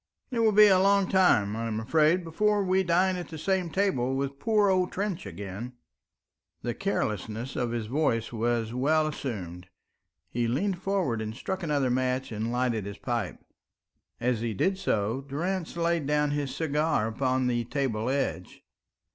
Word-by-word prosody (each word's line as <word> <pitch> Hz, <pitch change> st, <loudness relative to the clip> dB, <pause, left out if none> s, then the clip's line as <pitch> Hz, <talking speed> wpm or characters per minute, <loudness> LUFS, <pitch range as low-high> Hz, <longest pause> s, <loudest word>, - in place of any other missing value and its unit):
It 240 Hz, -, -1 dB
will 225 Hz, -1 st, +4 dB
be 210 Hz, +1 st, +8 dB
a 190 Hz, -3 st, +6 dB
long 200 Hz, 0 st, +4 dB
time, 110 Hz, -, +3 dB
I 115 Hz, +1 st, -3 dB
am 110 Hz, -1 st, -2 dB
afraid, 155 Hz, +9 st, +3 dB
before 205 Hz, +5 st, +1 dB
we 190 Hz, 0 st, +2 dB
dine 185 Hz, +1 st, +2 dB
at 175 Hz, -, -5 dB
the 160 Hz, -, -8 dB
same 185 Hz, +1 st, 0 dB
table 135 Hz, -10 st, 0 dB
with 140 Hz, 0 st, -3 dB
poor 210 Hz, +2 st, +3 dB
old 185 Hz, -1 st, +2 dB
Trench 195 Hz, -3 st, -3 dB
again." 100 Hz, +5 st, -7 dB, 0.9 s
The 120 Hz, -, -1 dB
carelessness 115 Hz, -, -2 dB
of 120 Hz, -2 st, -1 dB
his 115 Hz, -2 st, -2 dB
voice 115 Hz, -3 st, 0 dB
was 115 Hz, 0 st, -1 dB
well 155 Hz, +5 st, +2 dB
assumed; 100 Hz, -, -5 dB, 0.6 s
he 120 Hz, 0 st, -1 dB
leaned 175 Hz, -, -1 dB
forwards 185 Hz, -, 0 dB
and 110 Hz, 0 st, -4 dB
struck 190 Hz, +9 st, -4 dB
another 145 Hz, -6 st, +1 dB
match 130 Hz, 0 st, 0 dB
and 110 Hz, +1 st, -2 dB
lighted 120 Hz, -4 st, 0 dB
his 100 Hz, 0 st, -7 dB
pipe. 120 Hz, -7 st, -3 dB, 0.7 s
As 120 Hz, -1 st, 0 dB
he 115 Hz, -2 st, -2 dB
did 190 Hz, -, +1 dB
so, 110 Hz, -, 0 dB
Durrance 170 Hz, +6 st, -3 dB
laid 170 Hz, -3 st, 0 dB
down 150 Hz, 0 st, +2 dB
his 145 Hz, -2 st, -2 dB
cigar 150 Hz, -5 st, +1 dB
upon 130 Hz, +3 st, 0 dB
the 120 Hz, -1 st, +1 dB
table 125 Hz, -4 st, -1 dB
edge. 135 Hz, -9 st, -2 dB
140 Hz, 165 wpm, -28 LUFS, 115-180 Hz, 0.9 s, be